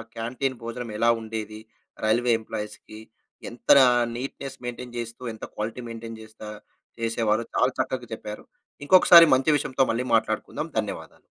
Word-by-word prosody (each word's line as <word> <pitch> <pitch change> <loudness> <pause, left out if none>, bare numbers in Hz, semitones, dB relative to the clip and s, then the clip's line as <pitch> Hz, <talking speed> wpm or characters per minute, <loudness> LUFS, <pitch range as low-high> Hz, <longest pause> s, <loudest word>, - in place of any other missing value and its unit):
Canteen 125 +2 -3
భోజనం 115 0 -6
ఎలా 115 +2 +3
ఉండేది? 110 -1 -6 0.5
రైల్వే 120 +3 +2
ఎంప్లాయీస్‌కి, 110 -1 -8 0.5
ఎంత 120 - -1 0.4
నీట్నెస్ 135 +1 -6
మెయింటైన్ 120 0 -7
జేస్తూ 115 +1 -6
ఎంత 110 - -8
క్వాలిటీ 110 +4 -4
మెయింటైన్ 115 0 -8
జేస్తా 110 0 -11 0.5
చేసేవారు 115 0 0
చాలా 130 +1 +3
చక్కగా 125 -2 -2
చెప్పారు. 105 -1 -8 0.4
ఇంకొకసారి 170 0 +8
మంచి 140 +4 +2
విషయంతో 135 -1 0
మళ్ళీ 120 +3 -2
మాట్లాడుకుందాం. 110 -1 -2
ధన్యవాదాలు. - - -6
115 Hz, 125 wpm, -25 LUFS, 110-125 Hz, 0.5 s, ఇంకొకసారి